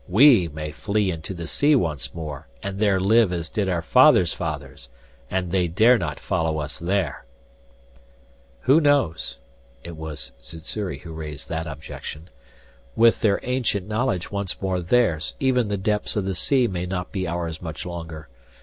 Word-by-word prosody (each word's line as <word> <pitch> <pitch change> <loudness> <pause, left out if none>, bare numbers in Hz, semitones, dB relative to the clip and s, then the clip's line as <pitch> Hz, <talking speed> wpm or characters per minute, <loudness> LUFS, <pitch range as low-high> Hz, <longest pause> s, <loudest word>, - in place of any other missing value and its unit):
We 110 - +6
may 75 0 -6
flee 100 +4 0
into 85 +3 -6
the 85 -1 -5
sea 145 - +3
once 80 - -1
more, 75 -6 -6 0.2
and 100 0 -4
there 100 -3 +3
live 110 +1 +4
as 85 -2 -3
did 100 -3 0
our 85 -2 -1
fathers' 85 +1 +5
fathers, 70 -6 -5 0.4
and 90 -2 -2
they 90 -2 +2
dare 110 +8 +5
not 75 -5 -3
follow 80 -1 -1
us 75 0 -5
there 85 -6 -1 0.7
" - - -30
"Who 140 +6 +5
knows?" 140 - +1 0.5
It 85 - -8
was 75 -6 -6
Sssuri 85 +7 -5
who 85 -2 -9
raised 75 -2 -7
that 80 0 -3
objection. 75 +3 -8 0.6
"With 115 0 +5
their 100 -3 +3
ancient 120 -6 -1
knowledge 110 -4 -1
once 100 -2 -2
more 95 -2 -1
theirs, 90 -4 +1
even 125 -4 +2
the 100 0 -1
depths 105 +2 -1
of 105 -3 0
the 95 - -1
sea 125 +8 +2
may 90 -3 -3
not 90 -1 -4
be 95 -3 -2
ours 85 -1 -3
much 80 -3 -6
longer. 80 -3 -7
90 Hz, 170 wpm, -24 LUFS, 80-105 Hz, 0.7 s, We